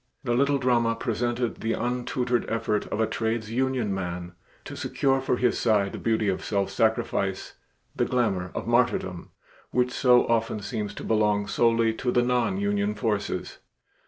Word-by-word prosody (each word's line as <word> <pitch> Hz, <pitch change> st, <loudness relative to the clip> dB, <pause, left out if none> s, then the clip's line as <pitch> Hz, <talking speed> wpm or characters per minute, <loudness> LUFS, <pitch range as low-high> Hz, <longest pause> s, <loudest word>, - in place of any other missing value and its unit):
The 120 Hz, -3 st, 0 dB
little 140 Hz, +3 st, +3 dB
drama 120 Hz, -3 st, +2 dB
presented 120 Hz, +1 st, -2 dB
the 115 Hz, 0 st, 0 dB
untutored 125 Hz, 0 st, -1 dB
effort 105 Hz, -2 st, -1 dB
of -, -, -3 dB
a 110 Hz, -, +3 dB
trades 110 Hz, 0 st, -2 dB
union 125 Hz, -4 st, 0 dB
man 90 Hz, -2 st, -4 dB, 0.3 s
to -, -, -7 dB
secure 135 Hz, -1 st, 0 dB
for 130 Hz, -1 st, 0 dB
his 120 Hz, -1 st, +1 dB
side 105 Hz, -4 st, +2 dB
the -, -, -6 dB
beauty 110 Hz, -2 st, +1 dB
of 95 Hz, -, -1 dB
self 100 Hz, -2 st, -1 dB
sacrifice, 110 Hz, -3 st, 0 dB, 0.4 s
the -, -, +1 dB
glamour 100 Hz, -8 st, 0 dB
of -, -, -3 dB
martyrdom, -, -, 0 dB, 0.4 s
which 125 Hz, 0 st, +1 dB
so 125 Hz, -1 st, +4 dB
often 115 Hz, -2 st, 0 dB
seems 105 Hz, 0 st, -4 dB
to -, -, -7 dB
belong 105 Hz, -2 st, +2 dB
solely 115 Hz, +1 st, +2 dB
to 125 Hz, +3 st, -3 dB
the 120 Hz, -, +3 dB
nonunion 200 Hz, -, 0 dB
forces. 105 Hz, -4 st, -2 dB
115 Hz, 160 wpm, -26 LUFS, 105-125 Hz, 0.4 s, so